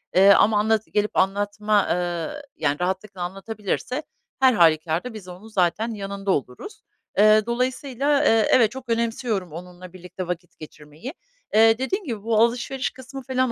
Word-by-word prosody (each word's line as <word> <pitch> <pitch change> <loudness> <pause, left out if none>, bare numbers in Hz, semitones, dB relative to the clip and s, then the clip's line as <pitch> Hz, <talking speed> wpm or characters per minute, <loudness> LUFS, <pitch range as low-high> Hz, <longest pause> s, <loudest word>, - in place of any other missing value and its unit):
Eee, 195 +2 +7
ama 205 +1 +4
anlat 220 0 +2
gelip 210 0 0
anlatma, 205 +1 +1
ııı, 175 - -2
yani, 145 -1 -1
rahatlıkla 190 +1 -3
anlatabilirse 205 - -4 0.4
her 260 -1 +5
hâlükârda 165 +4 +2
biz 210 -4 -10
onun 185 +4 -11
zaten 215 +3 0
yanında 195 -1 -4
oluruz. 135 - -4 0.4
Eee, 215 +1 +5
dolayısıyla, 260 +4 0
eee, 225 -4 +4
evet 230 -4 +5
çok 260 -2 -10
önemsiyorum 230 - -1
onunla 180 +2 -10
birlikte 180 0 -8
vakit 175 0 -6
geçirmeyi. 155 - -10 0.4
Eee, 225 +1 +5
dediğim 375 - -2
gibi 220 -6 -5
bu 225 -1 0
alışveriş 250 +3 -1
kısmı 265 +1 -10
falan 255 -1 0
210 Hz, 145 wpm, -23 LUFS, 180-240 Hz, 0.4 s, Eee